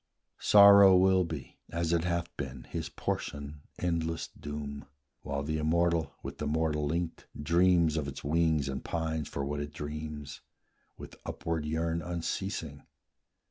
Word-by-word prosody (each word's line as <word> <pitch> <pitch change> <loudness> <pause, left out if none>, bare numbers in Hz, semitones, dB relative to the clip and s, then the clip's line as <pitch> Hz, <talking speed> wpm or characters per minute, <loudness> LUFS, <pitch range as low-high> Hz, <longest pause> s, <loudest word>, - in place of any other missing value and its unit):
Sorrow 100 -2 +8
will 95 0 +4
be, 75 -6 -7
As 85 0 -1
it 85 0 +1
hath 85 -1 -2
been, 65 -4 -6
his - - -5
portion; 70 0 -4 0.2
endless 85 -2 -1
doom, 75 -1 -7 0.4
While 70 0 -3
the 80 +2 -2
immortal 85 +1 +1
with - - -7
the - - -2
mortal 75 -1 0
linked 85 +2 -3
Dreams 85 +1 +3
of 75 -2 -1
its 70 - -7
wings 80 -1 +2
and 65 0 -4
pines 80 -2 -2
for 70 - -3
what 75 +1 -3
it 75 0 -4
dreams, 75 -1 -6 0.6
With - - -10
upward 80 -2 -3
yearn 80 +1 -1
unceasing. 85 -3 -4
80 Hz, 140 wpm, -30 LUFS, 75-85 Hz, 0.6 s, Sorrow